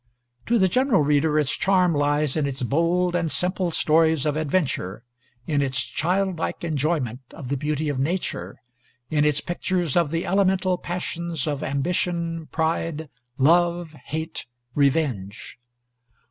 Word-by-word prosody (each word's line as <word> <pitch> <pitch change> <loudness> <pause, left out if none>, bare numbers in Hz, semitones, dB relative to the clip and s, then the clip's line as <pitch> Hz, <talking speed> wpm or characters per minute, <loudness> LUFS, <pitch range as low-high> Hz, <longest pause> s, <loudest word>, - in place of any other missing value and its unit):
To 235 - +3
the 190 -3 +4
general 250 - +3
reader 150 +1 +2
its 150 -3 +2
charm 185 -2 +3
lies 145 -1 +1
in 150 -3 +1
its 135 -2 -3
bold 170 +6 +1
and 165 -2 0
simple 180 +2 0
stories 160 -2 +3
of 150 -1 +1
adventure; 145 - -1 0.4
in 145 -3 +1
its 130 -1 +1
childlike 185 0 -1
enjoyment 150 -6 -1 0.2
of 125 - -8
the 140 - 0
beauty 150 +2 -2
of 145 -3 -1
Nature; 170 +7 -2 0.5
in 150 -1 +3
its 150 -1 +3
pictures 175 -3 -1
of 170 -4 +3
the 165 +2 -2
elemental 190 -1 +2
passions 170 -3 -3
of 145 -2 -2
ambition, 165 +3 -1
pride, 160 -1 -2 0.3
love, 170 +3 +3
hate, 160 -2 -4 0.3
revenge. 130 -10 -1
160 Hz, 135 wpm, -24 LUFS, 145-175 Hz, 0.5 s, the